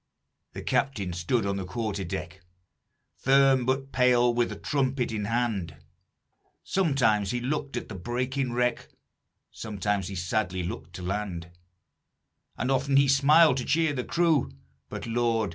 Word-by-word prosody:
"The -, -, -7 dB
captain 105 Hz, -10 st, -1 dB
stood 95 Hz, +6 st, 0 dB
on 100 Hz, 0 st, -1 dB
the 95 Hz, -, -3 dB
quarter 100 Hz, +1 st, -3 dB
deck, 85 Hz, 0 st, -6 dB, 0.8 s
Firm 135 Hz, -2 st, +4 dB
but 135 Hz, +1 st, -1 dB
pale 125 Hz, -1 st, +4 dB
with 120 Hz, 0 st, -1 dB
trumpet 130 Hz, -3 st, 0 dB
in 105 Hz, -2 st, -3 dB
hand; 110 Hz, -8 st, -1 dB, 0.9 s
Sometimes 130 Hz, -, +1 dB
he 120 Hz, -, -1 dB
looked 140 Hz, +3 st, -3 dB
at -, -, -5 dB
the -, -, -8 dB
breaking 125 Hz, +6 st, -2 dB
wreck, 125 Hz, 0 st, 0 dB, 0.6 s
Sometimes 105 Hz, -3 st, -2 dB
he 100 Hz, -, -6 dB
sadly 90 Hz, +1 st, -1 dB
looked 85 Hz, 0 st, -6 dB
to 90 Hz, -, -7 dB
land; 90 Hz, -3 st, -4 dB, 1.1 s
And 130 Hz, -, -1 dB
often 135 Hz, +1 st, +2 dB
he 140 Hz, 0 st, +5 dB
smiled 140 Hz, +2 st, +5 dB
to 125 Hz, -, -2 dB
cheer 160 Hz, +1 st, +1 dB
the 125 Hz, -3 st, -2 dB
crew 165 Hz, -, +2 dB, 0.4 s
But, -, -, -6 dB
Lord! 115 Hz, -2 st, 0 dB
120 Hz, 145 wpm, -27 LUFS, 100-135 Hz, 1.1 s, he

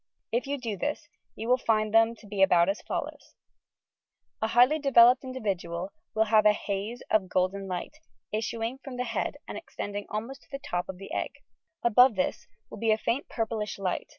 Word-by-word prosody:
If 240 Hz, +4 st, 0 dB
you 285 Hz, +1 st, -1 dB
do 230 Hz, -6 st, -4 dB
this, 295 Hz, +3 st, -3 dB, 0.3 s
you 225 Hz, -, -5 dB
will 250 Hz, +1 st, +4 dB
find 215 Hz, -3 st, +1 dB
them 225 Hz, +1 st, +5 dB
to 220 Hz, -, -17 dB
be 205 Hz, -1 st, -3 dB
about 175 Hz, -2 st, +5 dB
as 200 Hz, -, -1 dB
follows: -, -, -5 dB, 1.1 s
A 220 Hz, -, +2 dB
highly 245 Hz, +7 st, +5 dB
developed 250 Hz, -3 st, +6 dB
individual 195 Hz, -8 st, -3 dB, 0.2 s
will 220 Hz, -, +4 dB
have 215 Hz, -1 st, +4 dB
a 210 Hz, -, +6 dB
haze 210 Hz, +3 st, -4 dB
of 195 Hz, -4 st, +2 dB
golden 190 Hz, +2 st, 0 dB
light, 185 Hz, -, -5 dB, 0.3 s
issuing 225 Hz, +3 st, -2 dB
from 260 Hz, -3 st, -7 dB
the 250 Hz, -, 0 dB
head 230 Hz, -2 st, -2 dB
and -, -, -5 dB
extending 205 Hz, 0 st, -6 dB
almost 230 Hz, +6 st, -5 dB
to -, -, -24 dB
the 275 Hz, -, -3 dB
top 175 Hz, -10 st, -3 dB
of 190 Hz, -, -6 dB
the 195 Hz, -, -9 dB
egg. -, -, -2 dB, 0.5 s
Above 240 Hz, +1 st, +6 dB
this 185 Hz, -, -1 dB, 0.2 s
will -, -, -8 dB
be 225 Hz, -, 0 dB
a 215 Hz, -, +4 dB
faint 235 Hz, +5 st, -2 dB
purplish 220 Hz, -2 st, -2 dB
light. 190 Hz, -2 st, -2 dB
220 Hz, 190 wpm, -28 LUFS, 200-245 Hz, 1.1 s, developed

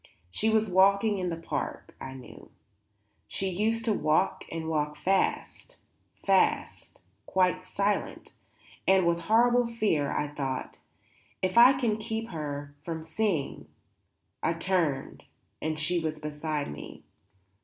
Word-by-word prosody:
She 220 Hz, -, +2 dB
was 220 Hz, 0 st, +3 dB
walking 200 Hz, +2 st, +4 dB
in 180 Hz, -1 st, -1 dB
the 165 Hz, -, -2 dB
park, 165 Hz, -, -5 dB
I 130 Hz, 0 st, -6 dB
knew; 130 Hz, -, -12 dB, 0.8 s
she 190 Hz, -, -2 dB
used 225 Hz, +5 st, 0 dB
to 220 Hz, -, +2 dB
walk 160 Hz, +1 st, +1 dB
and 160 Hz, -1 st, -4 dB
walk 150 Hz, -2 st, -1 dB
fast, 195 Hz, -, -1 dB, 0.5 s
fast, 195 Hz, -1 st, +1 dB, 0.3 s
quite 185 Hz, -1 st, +2 dB
silent; 200 Hz, +2 st, -2 dB, 0.6 s
and 190 Hz, -1 st, +5 dB
with 170 Hz, 0 st, +2 dB
horrible 240 Hz, +6 st, +3 dB
fear 210 Hz, -11 st, 0 dB
I 150 Hz, -, -1 dB
thought: 135 Hz, -3 st, -4 dB, 0.6 s
If 185 Hz, 0 st, 0 dB
I 245 Hz, +3 st, +9 dB
can 240 Hz, -5 st, 0 dB
keep 225 Hz, +1 st, -4 dB
her 145 Hz, -3 st, -5 dB
from 160 Hz, -2 st, -5 dB
seeing. 160 Hz, -3 st, -2 dB, 0.7 s
I -, -, +1 dB
turned 165 Hz, -6 st, -1 dB, 0.4 s
and 155 Hz, 0 st, -2 dB
she 170 Hz, +3 st, +1 dB
was 155 Hz, -1 st, -3 dB
beside 150 Hz, -, -3 dB
me. 75 Hz, -, -10 dB
180 Hz, 130 wpm, -28 LUFS, 155-215 Hz, 0.8 s, I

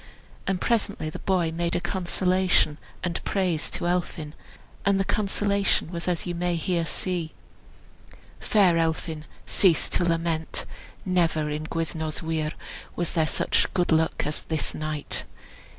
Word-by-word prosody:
And 190 Hz, -2 st, +1 dB
presently 205 Hz, -9 st, 0 dB
the -, -, -7 dB
boy 180 Hz, -4 st, +1 dB
made 170 Hz, +1 st, -1 dB
a -, -, +2 dB
Consolation, 185 Hz, -3 st, +2 dB, 0.2 s
and 175 Hz, -1 st, -2 dB
praise 180 Hz, -6 st, 0 dB
to -, -, -3 dB
Elphin; 175 Hz, -4 st, -1 dB, 0.5 s
and 200 Hz, -1 st, +3 dB
the 195 Hz, -, +2 dB
Consolation 200 Hz, -4 st, +1 dB
was 170 Hz, 0 st, -4 dB
as 175 Hz, -2 st, 0 dB
you 175 Hz, -, -2 dB
may 175 Hz, 0 st, 0 dB
here 170 Hz, 0 st, 0 dB
see: 175 Hz, -3 st, -2 dB, 1.1 s
"Fair 185 Hz, -6 st, +4 dB
Elphin, 160 Hz, -1 st, -1 dB, 0.2 s
cease 180 Hz, -5 st, +3 dB
to -, -, +1 dB
lament! 165 Hz, -1 st, 0 dB, 0.4 s
Never 165 Hz, -5 st, +2 dB
in 150 Hz, +1 st, -3 dB
Gwyddno's 160 Hz, -1 st, -3 dB
weir 160 Hz, -1 st, -1 dB, 0.4 s
Was 175 Hz, -2 st, 0 dB
there 160 Hz, -2 st, +2 dB
such -, -, +1 dB
good 175 Hz, -2 st, +2 dB
luck 160 Hz, 0 st, +2 dB
as 150 Hz, +1 st, -2 dB
this 160 Hz, -2 st, -2 dB
night. 155 Hz, -1 st, -2 dB
170 Hz, 140 wpm, -26 LUFS, 160-185 Hz, 1.1 s, Fair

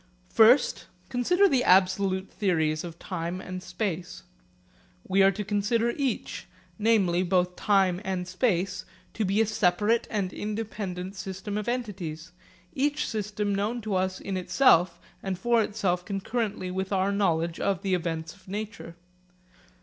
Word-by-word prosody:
First, 230 Hz, +5 st, +5 dB, 0.2 s
consider 355 Hz, +11 st, +3 dB
the 265 Hz, -7 st, +2 dB
absolute 190 Hz, +1 st, +3 dB
theories 160 Hz, -6 st, 0 dB
of 170 Hz, -1 st, -8 dB
time 175 Hz, 0 st, -4 dB
and 185 Hz, -1 st, -6 dB
space. 180 Hz, -1 st, -4 dB, 0.8 s
We 195 Hz, +1 st, +3 dB
are 195 Hz, -, +7 dB
to 200 Hz, +2 st, -3 dB
consider 220 Hz, +3 st, +1 dB
each, 265 Hz, -3 st, -3 dB, 0.3 s
namely 205 Hz, -5 st, +3 dB
both 180 Hz, -1 st, +1 dB
time 190 Hz, -3 st, +2 dB
and 185 Hz, -2 st, -3 dB
space, 185 Hz, -1 st, 0 dB, 0.3 s
to 220 Hz, -, -1 dB
be 200 Hz, +2 st, +2 dB
a -, -, +4 dB
separate 210 Hz, +2 st, +1 dB
and 195 Hz, -4 st, -2 dB
independent 205 Hz, -3 st, -4 dB
system 190 Hz, +2 st, -5 dB
of 210 Hz, -1 st, -3 dB
entities, 180 Hz, -9 st, -4 dB, 0.4 s
each 290 Hz, +2 st, 0 dB
system 210 Hz, -1 st, -2 dB
known 210 Hz, +5 st, -1 dB
to 215 Hz, -1 st, -3 dB
us 185 Hz, 0 st, 0 dB
in 195 Hz, -1 st, -4 dB
itself 180 Hz, -3 st, +3 dB, 0.2 s
and 190 Hz, -2 st, -3 dB
for 235 Hz, +4 st, +2 dB
itself 190 Hz, -5 st, -1 dB
concurrently 200 Hz, -1 st, -3 dB
with 190 Hz, +1 st, -3 dB
our 195 Hz, 0 st, +1 dB
knowledge 170 Hz, -4 st, 0 dB
of 195 Hz, -3 st, -1 dB
the 195 Hz, -1 st, 0 dB
events 165 Hz, -2 st, -2 dB
of 195 Hz, -2 st, -22 dB
nature. 200 Hz, -3 st, -6 dB
195 Hz, 140 wpm, -27 LUFS, 180-215 Hz, 0.8 s, are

